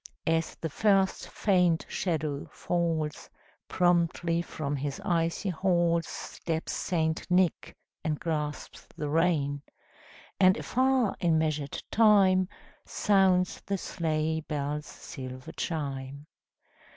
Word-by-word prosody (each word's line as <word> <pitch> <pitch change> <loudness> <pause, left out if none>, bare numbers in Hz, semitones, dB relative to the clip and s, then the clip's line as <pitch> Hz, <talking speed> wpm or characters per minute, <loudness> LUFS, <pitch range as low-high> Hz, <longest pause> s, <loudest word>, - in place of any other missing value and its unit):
As 165 0 0
the 165 - -4
first 195 -1 +2
faint 180 -5 +2
shadow 155 -5 -2
falls, 165 -3 -2 0.4
Promptly 170 -1 +2
from 145 -4 -4
his 140 0 -3
icy 170 +3 0
halls 170 -2 +1
Steps 160 -1 -4
St. 160 -2 -1
Nick, 180 -1 +1 0.3
and 155 -2 -1
grasps 150 -3 -4
the 150 - -3
rein: 150 -3 +1 0.8
And 185 0 +6
afar, 260 -3 +1
in 165 -2 +3
measured 155 -3 -1
time, 195 -4 +5 0.3
Sounds 190 -3 +2
the 200 - -2
sleigh 160 -3 -1
bells' 150 -1 -3
silver 130 -1 -8
chime. 140 -3 -4
165 Hz, 105 wpm, -29 LUFS, 150-180 Hz, 0.8 s, And